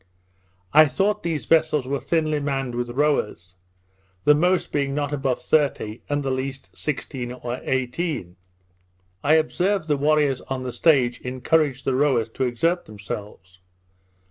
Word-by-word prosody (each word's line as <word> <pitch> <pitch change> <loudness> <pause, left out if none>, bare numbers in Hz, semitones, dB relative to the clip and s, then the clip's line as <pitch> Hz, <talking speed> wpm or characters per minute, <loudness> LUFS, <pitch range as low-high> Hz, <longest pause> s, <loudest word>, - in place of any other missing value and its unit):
I 155 0 +8
thought 200 +8 0
these 165 -3 -2
vessels 155 -4 +3
were 140 +1 -2
thinly 155 -2 0
manned 135 -3 -2
with 120 0 -3
rowers; 120 - -1 0.7
the 150 - +6
most 180 +4 +1
being 140 -1 -1
not 145 0 -1
above 135 -3 -1
thirty, 125 -7 0
and 145 0 0
the 135 - -1
least 130 +1 -5
sixteen 135 -4 -4
or 125 0 -5
eighteen. 130 - -2 0.9
I 155 +2 +5
observed 175 +3 +1
the 150 -2 +2
warriors 145 -2 +2
on 130 -1 -3
the 125 - -4
stage 130 -5 +3
encouraged 130 +2 0
the 135 - +1
rowers 130 -5 +2
to 130 +3 -2
exert 165 +9 0
themselves. 100 -3 -8
140 Hz, 145 wpm, -23 LUFS, 125-155 Hz, 0.9 s, I